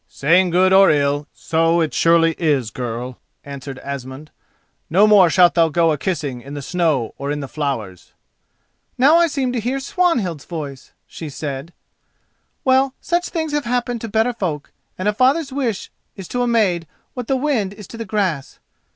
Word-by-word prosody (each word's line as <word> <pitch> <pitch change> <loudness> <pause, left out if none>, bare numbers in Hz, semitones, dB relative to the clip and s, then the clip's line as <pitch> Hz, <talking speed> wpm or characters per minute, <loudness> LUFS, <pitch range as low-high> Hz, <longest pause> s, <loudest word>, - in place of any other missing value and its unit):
"Saying 175 +6 +2
good 185 +2 +3
or 195 0 +7
ill, 145 0 +1
so 165 +1 +1
it 160 -2 0
surely 165 0 +4
is, 140 -9 +1
girl," 125 0 -5 0.3
answered 140 -1 -8
Asmund. 140 +2 -7 0.6
"No 190 +6 +5
more 205 -5 +6
shalt 175 +1 +5
thou 165 -1 +3
go 165 +1 +2
a 150 - 0
kissing, 145 -9 -3
in 140 +3 -9
the 145 - -6
snow 155 -8 0
or 140 - -4
in 145 - -2
the 140 - -5
flowers." 130 - -4 0.9
"Now 285 +6 +5
I 340 0 +4
seem 270 -5 -2
to 245 - -1
hear 250 +5 -2
Swanhild's 245 - 0
voice," 145 -6 -7
she 160 - -8
said. 140 +2 -6 0.9
"Well, 265 0 +2
such 350 +1 -1
things 320 -3 -3
have 295 -2 -1
happened 240 -1 -1
to 230 - -4
better 220 +3 +1
folk, 170 -10 -4 0.3
and 185 - -2
a 210 - +2
father's 270 +5 +2
wish 245 -8 -2 0.2
is 190 -3 -9
to 245 - -2
a 245 - +1
maid 195 -8 +1 0.3
what 250 -3 -6
the 270 - +1
wind 255 -9 0
is 205 0 -11
to 230 - -9
the 230 - -4
grass. 190 -9 -2
175 Hz, 180 wpm, -20 LUFS, 145-240 Hz, 0.9 s, or